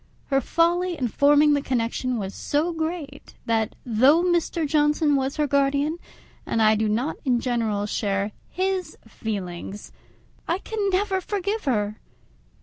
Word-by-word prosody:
Her 270 0 +3
folly 345 +4 +1
in 250 -3 -1
forming 290 +5 +5
the 285 - +1
connection 250 -1 -1
was 195 -2 -4
so 315 +4 -1
great 320 -3 -5
that, 225 -2 0
though 260 +8 +4
Mr. 345 -2 +1
Johnson 295 0 +2
was 270 0 -1
her 300 - +2
guardian, 280 +3 +1 0.4
and - - -2
I 215 -1 +5
do 215 0 +1
not 240 +8 -1
in 250 -3 +2
general 225 -5 -1
share 200 -1 -1 0.2
his 370 -3 -2
feelings, 200 -3 -6 0.6
I 340 +3 0 0.3
never 385 +1 +1
can - - -23
forgive 410 +1 -2
her. 210 -5 0
280 Hz, 145 wpm, -24 LUFS, 225-330 Hz, 0.6 s, forming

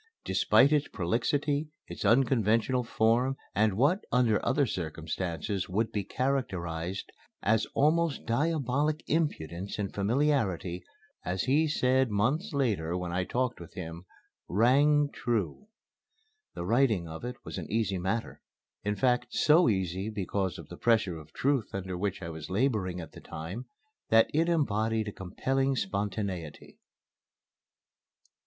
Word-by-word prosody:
Despite 140 +2 +4
its 150 -1 +2
prolixity, 140 - 0 0.2
its - - -7
unconventional 115 +1 +3
form 120 +4 +2 0.2
and 110 0 +3
what, 145 - +3
under 115 -3 +3
other 145 - +2
circumstances, 85 - -3
would 110 +4 0
be 105 -2 -1
characterized 95 -10 -2 0.3
as 110 +1 +2
almost 160 +1 +2
diabolic 145 +3 0
impudence 100 - -2
and 100 -2 -3
familiarity, 100 - 0 0.4
my 90 - -2
letter, - - -2
as 95 - -1
he 150 +5 +3
said 130 -3 +2
months 135 - 0
later 105 - 0
when 90 -1 -4
I 90 +1 0
talked 125 +2 -1
with 85 - -11
him, 85 -1 -7 0.4
"rang 145 +7 +4
true." 120 - -2 0.9
The 85 - -4
writing 110 -5 +2
of 80 +4 -8
it 125 +1 -4
was - - -5
an - - -7
easy 105 -4 0
matter; 105 +6 -2 0.4
in 105 0 0
fact, 125 +1 +2
so 160 +1 +5
easy, 95 0 -1
because 100 -3 -2
of - - -11
the - - -9
pressure 110 -8 +2
of 80 0 -14
truth 135 - 0
under 95 -1 -4
which 95 +1 -2
I 85 - -4
was 80 -1 -7
laboring 100 -4 0
at 80 - -8
the - - -12
time, 95 +11 -7 0.4
that 115 0 +5
it 165 +3 +2
embodied 110 -8 +1
a - - -9
compelling 135 +9 -1
spontaneity. 100 - -4
110 Hz, 140 wpm, -29 LUFS, 95-135 Hz, 0.9 s, so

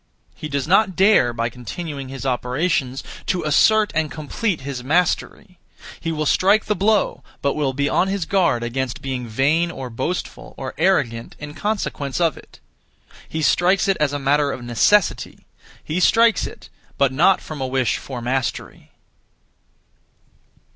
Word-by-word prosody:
He 155 - -7
does 140 -1 -2
not 190 +1 +3
dare 195 - +4
(by 115 0 -2
continuing 135 +4 -7
his 135 0 -7
operations) 130 +1 -1 0.2
to 180 -2 0
assert 210 +8 +4
and 155 -1 0
complete 165 - -3
his 130 -2 -5
mastery. 175 +4 -1 0.4
He 165 - -3
will 155 -1 -2
strike 200 +8 +3
the 210 - 0
blow, 210 +2 +1 0.2
but 140 - +2
will 145 -3 0
be 140 +2 0
on 185 - +2
his 195 -3 -2
guard 170 -11 +1
against 125 +1 -3
being 130 -3 -4
vain 145 +9 +1
or 130 -6 -7
boastful 175 +10 -4
or 135 -1 -5
arrogant 140 -11 +1
in 145 0 -8
consequence 175 -9 -3
of 165 -3 +2
it. - - -16 0.7
He 160 0 -3
strikes 180 +6 +3
it 195 - +3
as 150 -2 +2
a 145 - -2
matter 145 +1 +1
of 120 - -6
necessity; 140 - +1 0.4
he 160 +4 -2
strikes 225 0 +4
it, - - -13 0.3
but 140 -2 +2
not 180 +7 +4
from 155 -3 -8
a 130 - -1
wish 130 -3 0
for 125 -3 -7
mastery. 130 0 -3
150 Hz, 155 wpm, -21 LUFS, 130-180 Hz, 0.7 s, dare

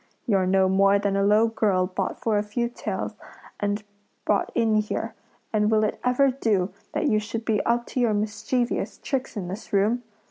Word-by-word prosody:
You're 195 -5 +2
no 190 0 +4
more 195 +1 +4
than 200 -1 0
a 195 - +2
low 210 +3 +4
girl 200 -5 +1
bought 185 +1 -3
for 215 -2 +1
a - - +1
few 235 +3 -2
taels 240 - -4 0.5
and 205 +1 -1 0.4
brought - - +1
in 225 -1 +2
here; 215 +1 -2 0.4
and 210 -1 +3
will 215 -1 +3
it 210 - -1
ever 255 +2 +3
do 210 -7 0 0.2
that - - 0
you 215 - +3
should 225 +2 -5
be 215 -3 +2
up 235 +1 +2
to - - 0
your 230 -4 +2
mischievous 220 +4 -1
tricks 265 -4 -3
in 185 -3 -3
this 190 +5 -7
room? 210 +5 +2
215 Hz, 190 wpm, -25 LUFS, 200-230 Hz, 0.5 s, no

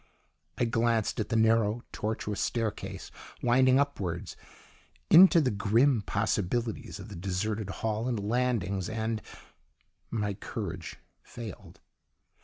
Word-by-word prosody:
I 120 - +2
glanced 115 0 +1
at 105 - -2
the - - 0
narrow, 110 0 +3
tortuous 105 -1 -3
staircase 115 -3 -3 0.3
winding 130 +2 +5
upwards 95 -12 -2 0.8
into 180 +1 +9
the 135 -5 +2
grim 115 +5 +3
possibilities 105 -1 -2
of 100 +3 -9
the 100 - -8
deserted 100 +4 -2
hall 110 +4 -2
and 120 -4 -1
landings 100 -4 0
and 110 0 -2 0.9
my 105 -3 -1
courage - - -6 0.2
failed. 115 -6 -10
110 Hz, 110 wpm, -29 LUFS, 100-120 Hz, 0.9 s, into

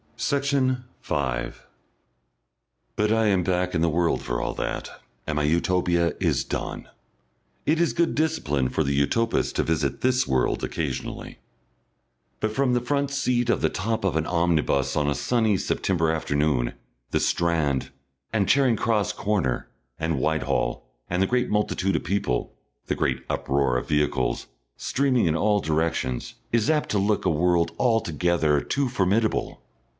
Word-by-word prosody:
Section 140 -3 0 0.2
5 65 -3 -3 1.3
But 105 0 +1
I 110 0 +3
am 95 -3 +2
back 90 0 0
in 80 - +1
the 85 - +3
world 85 +1 +1
for - - -2
all - - -2
that, - - -3 0.4
and 80 - -1
my 75 - +1
Utopia 85 +1 +2
is - - +1
done. - - -4 0.8
It 155 +2 +2
is 170 - +2
good 170 -1 +1
discipline 75 - 0
for 80 - 0
the 70 -1 0
Utopist 115 +12 +1
to - - +2
visit 75 -4 -1
this 130 0 +2
world 65 -2 +1
occasionally. - - -4 1.0
But 110 - 0
from 130 0 +1
the 120 - +2
front 140 +2 -1
seat 125 -3 0
on - - +3
the - - +2
top 110 +3 -2
of 95 -5 0
an 80 -1 +1
omnibus 85 -6 +1
on 75 -1 +1
a 70 - 0
sunny 110 -5 +1
September 85 -3 0
afternoon, 75 -5 0 0.4
the - - +1
Strand, 75 -6 +1 0.4
and 105 -4 +1
Charing 130 -4 +4
Cross 110 -1 0
corner, 90 -12 -1 0.3
and 80 0 -1
Whitehall, 75 -6 0 0.3
and 90 +2 0
the 95 - +3
great 125 0 +1
multitude 95 -2 0
of - - -1
people, 80 -10 -1 0.3
the - - -1
great - - -1
uproar 70 -2 +1
of - - -4
vehicles, 75 -4 0 0.3
streaming 130 -5 +1
in 80 -1 +2
all 105 +3 +2
directions, 80 -6 -1 0.2
is 115 -2 +2
apt 155 -1 +1
to 105 - +1
look 100 +1 +1
a - - +4
world 85 +1 +2
altogether 85 - +2
too 140 -1 0
formidable. 110 -1 0
90 Hz, 155 wpm, -25 LUFS, 75-115 Hz, 1.3 s, Charing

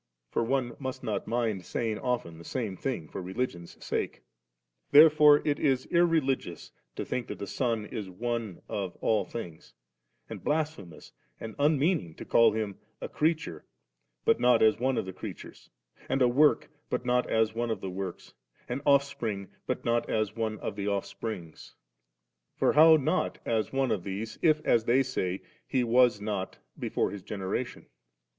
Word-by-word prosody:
(For - - +1
one 120 0 -1
must 130 -2 -5
not 105 -4 -2
mind 115 -5 -1
saying 110 +3 -2
often 120 -11 -2
the - - -11
same 110 -1 -3
thing 105 - -3
for - - -6
religion's 90 -2 -4
sake.) - - -3 0.7
Therefore 150 0 +7
it 145 -1 +1
is 135 -3 +1
irreli 165 -6 +3
gious 85 -2 -10 0.2
to - - -4
think 125 - -3
that 105 - -6
the 100 - -5
Son 115 +1 -1
is 105 -2 -6
one 115 0 -4
of 95 -3 -4
all 110 -2 +1
things; 85 - -8 0.5
and - - -8
blasphemous 150 - -3 0.3
and 110 -1 -7
unmeaning 145 - +2
to - - -9
call 115 -1 +5
Him 105 -3 -3 0.2
*a - - -4
creature, 155 - -1 0.6
but - - +4
not 120 -2 +4
as 110 0 +4
one 130 +1 +1
of - - -1
the 95 - -6
creatures, - - -9 0.4
and 135 - +2
a - - +6
work, 145 +5 +3 0.2
but - - -2
not 125 0 +1
as 110 -1 +2
one 120 +1 -2
of 110 - -1
the 95 - -4
works, 95 -1 -6 0.3
an 125 +3 -3
offsprings 135 -8 +1 0.2
but - - -2
not 120 0 +1
as 110 -2 0
one 110 -2 -2
of - - -4
the 100 0 -3
offsprings 100 -3 -5 0.4
;* - - -55
for - - +3
how 160 +2 +8
not 155 +5 0
as 110 -3 0
one 135 -1 +1
of 95 -5 -1
these, 100 +4 -5
i^ 155 -2 +3
as 115 -1 +3
they 125 +3 +4
say, 95 -8 -3 0.2
He 130 -2 +1
was 120 -2 +4
not 100 -2 -4 0.2
before - - -1
His 100 - -7
generation 100 +5 -4
» - - -47
115 Hz, 175 wpm, -29 LUFS, 100-135 Hz, 0.7 s, how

